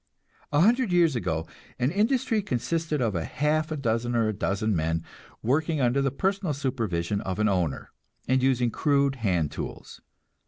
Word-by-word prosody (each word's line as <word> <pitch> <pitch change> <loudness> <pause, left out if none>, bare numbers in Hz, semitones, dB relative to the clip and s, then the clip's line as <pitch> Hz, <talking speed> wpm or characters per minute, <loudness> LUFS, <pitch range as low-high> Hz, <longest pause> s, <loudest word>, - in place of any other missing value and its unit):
A 145 +1 +3
hundred 235 +2 +3
years 170 -5 +4
ago 80 -8 -1 0.3
an 125 +4 +1
industry 225 +3 +1
consisted 155 - -1
of 110 -3 0
a 85 -3 -1
half 150 - 0
a 155 - -2
dozen 120 -2 -1
or 115 -2 +2
a - - -1
dozen 105 +1 -1
men, 80 0 0 0.4
working 155 +6 +1
under 125 +1 +2
the 135 - +2
personal 190 +4 -1
supervision 105 - -1
of 95 -2 -3
an 105 0 +2
owner, 90 -8 -1 0.4
and 130 +1 +3
using 125 -2 +2
crude 140 -1 +1
hand 90 - 0
tools. - - -7
130 Hz, 165 wpm, -26 LUFS, 105-155 Hz, 0.4 s, years